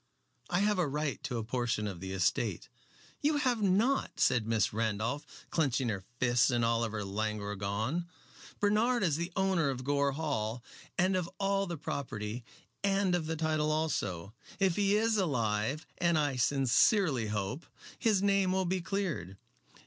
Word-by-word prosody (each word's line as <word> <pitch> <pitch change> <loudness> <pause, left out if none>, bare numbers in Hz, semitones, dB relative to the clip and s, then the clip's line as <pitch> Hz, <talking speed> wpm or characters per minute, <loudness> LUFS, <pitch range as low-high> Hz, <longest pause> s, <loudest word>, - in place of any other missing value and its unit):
"I 175 +2 +1
have 205 -1 +2
a 175 - +2
right 145 0 -2
to 125 - -2
a 115 - -2
portion 115 -2 -1
of 95 -4 -4
the 95 +1 -6
estate." 95 -2 0 0.5
"You 295 +1 +2
have 250 -6 +1
not," 210 +8 +2
said 120 -4 +3
Miss 110 -3 +1
Randolph, 115 +6 -1 0.2
clenching 135 -6 +1
her 100 -3 -3 0.2
fists 120 0 +3
and 120 -2 +2
all 115 0 +2
her 110 -3 -2
languor 105 0 -2
gone. 110 - -2 0.5
"Bernard 215 +3 +2
is 160 -5 +2
the 170 +2 -3
owner 190 -6 +2
of 130 -1 -3
Gore 140 0 +1
Hall 125 -6 -2 0.3
and 185 +1 +3
of 180 -2 -1
all 195 0 +1
the 170 -1 -4
property, 115 -5 -4 0.4
and 195 -2 +2
of 170 -3 0
the 160 - -1
title 155 -1 0
also. 100 - -2 0.3
If 190 -4 +3
he 200 0 +3
is 225 0 +2
alive, 125 - 0
as 170 -2 +3
I 145 -3 +1
sincerely 135 - +3
hope, 105 +8 -3 0.3
his 210 -4 +2
name 195 -2 +3
will 190 0 +1
be 185 +1 0
cleared." 170 - -3
145 Hz, 165 wpm, -31 LUFS, 110-185 Hz, 0.5 s, said